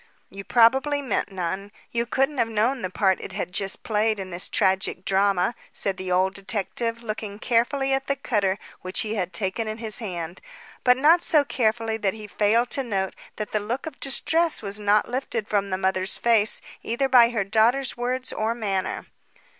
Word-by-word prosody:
"You 195 Hz, +1 st, -8 dB
probably 265 Hz, +7 st, +4 dB
meant 255 Hz, -, -1 dB
none. 190 Hz, +2 st, -4 dB, 0.2 s
You 235 Hz, 0 st, -1 dB
couldn't 270 Hz, +3 st, 0 dB
have 230 Hz, -, +3 dB
known 230 Hz, +4 st, +1 dB
the 185 Hz, -, -2 dB
part 190 Hz, 0 st, +1 dB
it 190 Hz, -, -8 dB
had 190 Hz, -1 st, -4 dB
just 195 Hz, 0 st, +1 dB
played 220 Hz, 0 st, +1 dB
in 190 Hz, -1 st, -6 dB
this 175 Hz, +2 st, -2 dB
tragic 190 Hz, -1 st, 0 dB
drama," 195 Hz, +1 st, +2 dB, 0.2 s
said 195 Hz, -2 st, -1 dB
the 185 Hz, -1 st, -4 dB
old 185 Hz, +1 st, +2 dB
detective 210 Hz, +4 st, -3 dB
looking 215 Hz, -2 st, -5 dB
carefully 265 Hz, +4 st, +1 dB
at 270 Hz, 0 st, -1 dB
the 280 Hz, -, +1 dB
cutter 205 Hz, -8 st, 0 dB, 0.2 s
which 185 Hz, +1 st, -2 dB
he 215 Hz, 0 st, -3 dB
had 185 Hz, -4 st, -2 dB
taken 190 Hz, +4 st, -2 dB
in 215 Hz, 0 st, -4 dB
his 225 Hz, -2 st, -4 dB
hand, 175 Hz, -5 st, -5 dB, 0.4 s
but 250 Hz, 0 st, +5 dB
not 320 Hz, +6 st, +5 dB
so 300 Hz, -4 st, +4 dB
carefully 225 Hz, -3 st, 0 dB
that 200 Hz, -2 st, -1 dB
he 215 Hz, -1 st, -9 dB
failed 215 Hz, +4 st, +1 dB
to 275 Hz, -, 0 dB
note 195 Hz, -5 st, -2 dB, 0.2 s
that 215 Hz, -1 st, -5 dB
the 215 Hz, -, +1 dB
look 230 Hz, +6 st, -4 dB
of 315 Hz, -3 st, -8 dB
distress 325 Hz, +2 st, +1 dB
was 200 Hz, +1 st, -4 dB
not 210 Hz, 0 st, +3 dB
lifted 240 Hz, -3 st, -3 dB
from 200 Hz, -1 st, 0 dB
the 185 Hz, -, -1 dB
mother's 190 Hz, 0 st, 0 dB
face 225 Hz, -2 st, +2 dB, 0.2 s
either 240 Hz, +4 st, 0 dB
by 245 Hz, -3 st, +6 dB
her 225 Hz, -4 st, -1 dB
daughter's 230 Hz, +6 st, +2 dB
words 250 Hz, +1 st, -2 dB
or 220 Hz, +2 st, -1 dB
manner. 195 Hz, -5 st, -2 dB
215 Hz, 190 wpm, -24 LUFS, 195-245 Hz, 0.4 s, by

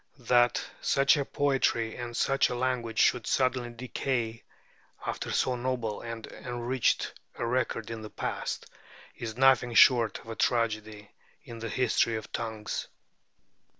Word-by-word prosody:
That 120 Hz, -1 st, +3 dB, 0.2 s
such 135 Hz, 0 st, +4 dB
a 145 Hz, -, 0 dB
poetry 135 Hz, -6 st, +1 dB
and 120 Hz, -1 st, -5 dB
such 135 Hz, 0 st, +3 dB
a 125 Hz, -, -3 dB
language 120 Hz, -3 st, -1 dB
should 125 Hz, -3 st, +3 dB
suddenly 130 Hz, -2 st, +1 dB
decay 120 Hz, -1 st, -3 dB, 0.6 s
after -, -, -3 dB
so 130 Hz, -, +1 dB
noble 120 Hz, -4 st, -2 dB
and 115 Hz, -1 st, -6 dB
enriched 120 Hz, +1 st, -1 dB, 0.2 s
a -, -, -3 dB
record 115 Hz, -2 st, -1 dB
in 115 Hz, -1 st, -5 dB
the 110 Hz, -, -8 dB
past, -, -, -4 dB, 0.5 s
is 115 Hz, -1 st, -6 dB
nothing 130 Hz, -2 st, +4 dB
short 120 Hz, -3 st, +6 dB
of -, -, -14 dB
a 115 Hz, -, -4 dB
tragedy 110 Hz, -3 st, -1 dB, 0.3 s
in 115 Hz, -1 st, -9 dB
the 115 Hz, 0 st, -4 dB
history 115 Hz, -1 st, +2 dB
of 110 Hz, -, -6 dB
tongues. 110 Hz, -2 st, -4 dB
120 Hz, 140 wpm, -29 LUFS, 115-125 Hz, 0.6 s, short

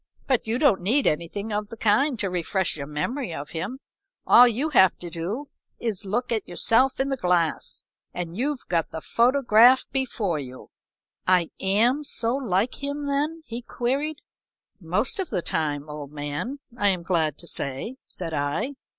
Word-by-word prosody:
"But 255 Hz, -4 st, +1 dB
you 225 Hz, +2 st, 0 dB
don't 255 Hz, -10 st, +3 dB
need 245 Hz, +10 st, +2 dB
anything 200 Hz, +7 st, -1 dB
of 210 Hz, 0 st, -2 dB
the 230 Hz, -, -8 dB
kind 230 Hz, +6 st, +2 dB
to 200 Hz, -2 st, 0 dB
refresh 180 Hz, +1 st, -1 dB
your 140 Hz, -2 st, -6 dB
memory 175 Hz, -, -3 dB
of 145 Hz, -2 st, -6 dB
him. 185 Hz, +10 st, -4 dB, 0.5 s
All 245 Hz, -, +8 dB
you 250 Hz, +7 st, 0 dB
have 190 Hz, -, +5 dB
to 175 Hz, -1 st, -8 dB
do 200 Hz, -, -4 dB, 0.3 s
is 225 Hz, -5 st, -2 dB
to 200 Hz, -, -10 dB
look 240 Hz, +5 st, -1 dB
at 220 Hz, -3 st, -1 dB
yourself 230 Hz, +9 st, +3 dB
in 270 Hz, +1 st, +1 dB
the 270 Hz, -, -1 dB
glass, 175 Hz, -, 0 dB, 0.3 s
and 175 Hz, -1 st, -5 dB
you've 270 Hz, +4 st, -2 dB
got 165 Hz, -2 st, 0 dB
the 160 Hz, -, -5 dB
photograph 245 Hz, -, +5 dB
before 225 Hz, -, -1 dB
you." 130 Hz, -2 st, -9 dB, 0.6 s
"I 180 Hz, -2 st, +3 dB
am 230 Hz, +9 st, +2 dB
so 240 Hz, -4 st, 0 dB
like 235 Hz, -1 st, -1 dB
him 285 Hz, +1 st, -3 dB
then?" 295 Hz, +3 st, -1 dB
he 235 Hz, +1 st, -6 dB
queried. 275 Hz, +6 st, -2 dB, 0.6 s
"Most 190 Hz, -, -1 dB
of 375 Hz, -, -2 dB
the 175 Hz, -, -2 dB
time, 150 Hz, -2 st, -1 dB
old 150 Hz, -1 st, -7 dB
man, 145 Hz, -, -4 dB, 0.2 s
I 205 Hz, -4 st, +1 dB
am 185 Hz, -3 st, +1 dB
glad 160 Hz, -4 st, 0 dB
to -, -, -9 dB
say," 140 Hz, -, -3 dB
said 165 Hz, -3 st, -5 dB
I. 145 Hz, -, -1 dB
210 Hz, 175 wpm, -25 LUFS, 170-260 Hz, 0.6 s, All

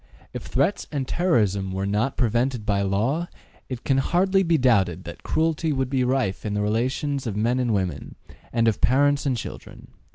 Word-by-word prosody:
If -, -, -7 dB
threats 140 Hz, +10 st, 0 dB
and 140 Hz, -4 st, -2 dB
terrorism 105 Hz, -, +1 dB
were 95 Hz, +1 st, -2 dB
not 105 Hz, +7 st, 0 dB
prevented 120 Hz, -1 st, 0 dB
by 100 Hz, -1 st, +1 dB
law, 115 Hz, -, 0 dB, 0.4 s
it 125 Hz, -2 st, -5 dB
can 135 Hz, -1 st, +2 dB
hardly 190 Hz, +6 st, +2 dB
be 170 Hz, -3 st, +2 dB
doubted 95 Hz, -, +2 dB
that 85 Hz, -, -9 dB
cruelty 160 Hz, 0 st, 0 dB
would 135 Hz, -2 st, -1 dB
be 130 Hz, -2 st, +1 dB
rife 125 Hz, -6 st, 0 dB
in 105 Hz, -1 st, -3 dB
the 105 Hz, -, 0 dB
relations 130 Hz, +5 st, -1 dB
of 105 Hz, -, -3 dB
men 120 Hz, +4 st, +1 dB
and 125 Hz, -2 st, 0 dB
women, 90 Hz, -8 st, -2 dB, 0.4 s
and 115 Hz, -1 st, +2 dB
of 110 Hz, -, +1 dB
parents 145 Hz, +3 st, +3 dB
and 130 Hz, -3 st, +1 dB
children. -, -, -9 dB
125 Hz, 185 wpm, -24 LUFS, 105-140 Hz, 0.4 s, parents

